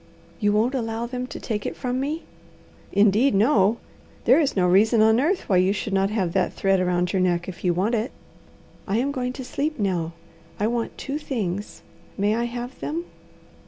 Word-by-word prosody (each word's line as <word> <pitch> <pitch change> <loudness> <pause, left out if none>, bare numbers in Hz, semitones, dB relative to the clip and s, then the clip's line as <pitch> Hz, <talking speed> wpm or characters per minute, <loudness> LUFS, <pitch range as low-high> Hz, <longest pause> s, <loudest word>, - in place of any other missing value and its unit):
"You 205 -1 +2
won't 220 +5 +2
allow 230 -2 -2
them 250 +1 -4
to - - -7
take 210 -3 -3
it - - -4
from 250 -1 -2
me?" 300 +5 -2 0.7
"Indeed 210 +5 +4
no! 215 -1 +4 0.5
There - - +6
is 295 -4 +1
no 180 -2 +3
reason 215 +6 +4
on 220 +1 +5
earth 345 +8 +1
why 190 - +3
you 185 +2 +3
should 205 0 -4
not 195 0 +2
have 190 -6 -1
that 190 -1 +1
thread 195 -1 +2
around 180 0 0
your 190 - +2
neck 175 -1 +1
if 185 - -8
you 180 - +3
want 190 +7 0
it." 230 +2 0 0.8
"I 200 - +1
am 270 +4 +1
going 250 -2 -2
to 260 -1 -7
sleep 305 +4 -2
now. 175 -5 -1 0.5
I 205 - +1
want 235 +1 -2
two 280 +2 -4
things. 205 - -4 0.3
May 205 +1 +2
I 235 +1 0
have 240 +1 -6
them?" 330 +3 -3
220 Hz, 195 wpm, -24 LUFS, 195-250 Hz, 0.8 s, There